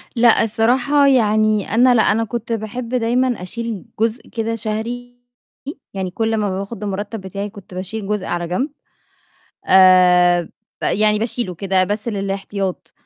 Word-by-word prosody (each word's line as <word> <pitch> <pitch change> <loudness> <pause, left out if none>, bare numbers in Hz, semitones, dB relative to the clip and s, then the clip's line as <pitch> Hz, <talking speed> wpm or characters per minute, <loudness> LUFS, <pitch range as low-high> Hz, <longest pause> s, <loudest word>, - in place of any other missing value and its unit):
لأ 235 -1 +5
الصراحة 245 +6 +2
يعني 215 -5 +2
أنا 245 +2 +5
لأ 225 - +5
أنا 225 +2 +2
كنت 230 +1 -5
باحب 230 +2 -5
دايمًا 245 -1 0
أشيل 230 +2 -5
جزء 225 +2 -1
كده 230 -1 -2
شهري، 230 +3 -5 0.8
يعني 190 -2 -3
كلّ 225 +3 -1
ما 200 -3 -1
باخد 200 +1 -6
المُرتب 205 +1 -4
بتاعي 200 +2 -5
كنت 200 -2 -14
باشيل 195 +3 -5
جزء 210 -2 -2
على 175 0 -3
جنب، 220 - -1 1.0
آآ 180 -2 +6 0.4
ب - - -1
يعني 210 0 +2
باشيلُه 225 -3 -3
كده 190 +1 +1
بس 210 +4 -3
للاحتياط، 195 -2 -4
215 Hz, 145 wpm, -19 LUFS, 195-230 Hz, 1.0 s, آآ